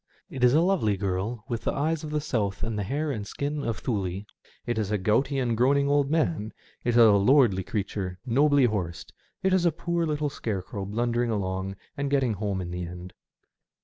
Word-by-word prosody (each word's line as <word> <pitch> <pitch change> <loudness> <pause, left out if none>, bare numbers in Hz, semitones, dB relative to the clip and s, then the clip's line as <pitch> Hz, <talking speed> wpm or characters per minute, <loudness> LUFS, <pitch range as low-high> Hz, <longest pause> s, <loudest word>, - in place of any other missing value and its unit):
It 130 - -4
is 125 +2 +6
a 160 - +5
lovely 170 - +2
girl 100 +4 -2
with 120 -4 -3
the - - -1
eyes 155 +2 -1
of 155 - -5
the 150 0 0
South 105 -9 -2
and 115 -1 -2
the 105 - -1
hair 145 +9 -1
and 105 -6 -4
skin 145 +3 -3
of 115 -2 -3
Thnle, 100 -4 -2 0.4
it 120 -2 -1
is 105 -3 -1
a 105 - +1
gouty 115 +9 +1
and 120 -3 0
groaning 140 +4 +3
old 145 -1 +2
man, 155 -8 0 0.3
it - - 0
is - - +4
a 115 -2 +8
lordly 100 -1 +4
creature, 95 -2 -3
nobly 140 +2 +4
horsed, 95 -7 -3 0.3
it 190 0 +3
is 185 -2 +3
a 170 - +4
poor 170 +1 -1
little 150 -1 -1
scarecrow 100 -3 -4
blundering 120 +3 0
along 95 -2 -2 0.2
and 140 0 -2
getting 135 -5 +2
home 100 -2 -2
in 85 -1 -5
the 90 0 -4
end. 90 +1 -8
115 Hz, 205 wpm, -27 LUFS, 100-140 Hz, 0.4 s, a